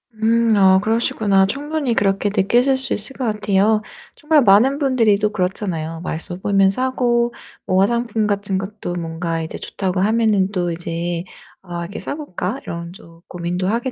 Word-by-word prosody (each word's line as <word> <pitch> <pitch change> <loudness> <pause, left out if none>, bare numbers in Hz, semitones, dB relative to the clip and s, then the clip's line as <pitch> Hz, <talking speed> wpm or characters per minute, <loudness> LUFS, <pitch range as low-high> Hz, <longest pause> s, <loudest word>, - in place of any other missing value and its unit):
음 225 +1 +2
아 190 -1 +5
그러시구나. 210 -2 +2
충분히 285 +3 -2
그렇게 200 -1 +1
느끼실 240 +7 +3
수 265 - 0
있을 215 +6 -1
것 260 - -2
같아요. 210 0 +2 0.3
정말 300 0 +3
많은 240 +5 +5
분들이 245 -8 +3
또 210 0 0
그렇잖아요. 180 -5 -3
맛있어 175 0 -4
보면 195 0 +3
사고 240 0 0 0.3
뭐 190 -3 +2
화장품 235 0 0
같은 200 -2 -1
것도 195 -1 -5
뭔가 165 0 -3
이제 160 - -6
좋다고 185 -1 -3
하면은 210 -1 +2
또 175 -3 -1
이제 170 0 -3 0.4
아 175 -2 -6
이렇게 185 +5 -7
'사 - - -4
볼까?' 260 - -4
이런 170 0 -6
또 165 -5 -16
고민도 180 +1 -3
하게 235 +5 -1
200 Hz, 340 characters per minute, -20 LUFS, 180-235 Hz, 0.4 s, 아